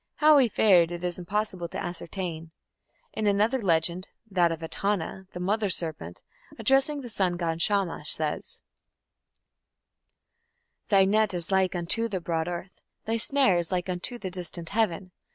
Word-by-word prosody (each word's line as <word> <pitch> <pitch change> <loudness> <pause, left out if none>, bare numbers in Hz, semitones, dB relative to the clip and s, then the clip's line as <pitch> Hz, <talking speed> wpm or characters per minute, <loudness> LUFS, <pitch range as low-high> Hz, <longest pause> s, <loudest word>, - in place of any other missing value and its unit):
How 300 -1 +6
he 250 -4 +4
fared 185 -6 +4
it 175 0 -6
is 180 0 -2
impossible 190 -1 -3
to - - -7
ascertain. 175 -2 -5 0.6
In 215 - -1
another 215 +6 +2
legend 170 -1 +1 0.2
that 175 -3 +3
of 165 0 -5
Etana 190 +1 -2
the 180 - -6
mother 205 +3 0
serpent, 155 - -4 0.3
addressing 270 +5 +2
the 250 - -8
sun 190 -6 0
god, 165 -1 -2
Shamash, 195 -6 0
says: 155 -1 -4 2.3
Thy 195 -2 +5
net 210 0 +2
is 175 +1 -5
like 190 -1 +2
unto 200 +7 +1
the 190 -3 -2
broad 165 -1 -2
earth; 175 +1 -7 0.2
Thy 225 +1 0
snare 260 -5 +4
is 170 +1 +2
like 180 0 -1
unto 185 +7 -3
the 190 -5 -6
distant 175 -2 -3
heaven! 195 -4 -1
185 Hz, 155 wpm, -27 LUFS, 170-210 Hz, 2.3 s, How